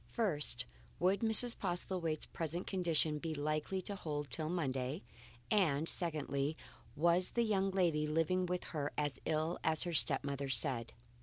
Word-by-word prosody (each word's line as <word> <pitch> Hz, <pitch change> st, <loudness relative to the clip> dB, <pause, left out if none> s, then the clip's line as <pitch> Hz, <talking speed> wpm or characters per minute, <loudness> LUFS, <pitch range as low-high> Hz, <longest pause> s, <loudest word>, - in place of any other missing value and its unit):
First, 150 Hz, -, +1 dB, 0.3 s
would 185 Hz, +3 st, +2 dB
Mrs. 225 Hz, +2 st, +5 dB
Postlethwaite's 175 Hz, -3 st, -2 dB
present 165 Hz, +2 st, -4 dB
condition 165 Hz, -5 st, 0 dB
be 160 Hz, 0 st, -4 dB
likely 155 Hz, +6 st, -2 dB
to 205 Hz, -, -2 dB
hold 150 Hz, -5 st, -4 dB
good -, -, -2 dB
till 155 Hz, -1 st, -3 dB
Monday; 140 Hz, -2 st, -2 dB, 0.5 s
and 160 Hz, -7 st, +2 dB
secondly, 150 Hz, -3 st, 0 dB, 0.4 s
was 170 Hz, +4 st, +2 dB
the 235 Hz, -, +2 dB
young 195 Hz, -3 st, +1 dB
lady 170 Hz, -6 st, +1 dB
living 165 Hz, +4 st, +1 dB
with 180 Hz, 0 st, -2 dB
her 145 Hz, -2 st, -2 dB
as 145 Hz, -2 st, -1 dB
ill 160 Hz, +2 st, -1 dB
as 160 Hz, -1 st, +3 dB
her 175 Hz, -1 st, -3 dB
step 155 Hz, -, +3 dB
mother 140 Hz, -1 st, -3 dB
said. 120 Hz, -2 st, +2 dB
160 Hz, 155 wpm, -35 LUFS, 150-180 Hz, 0.5 s, Mrs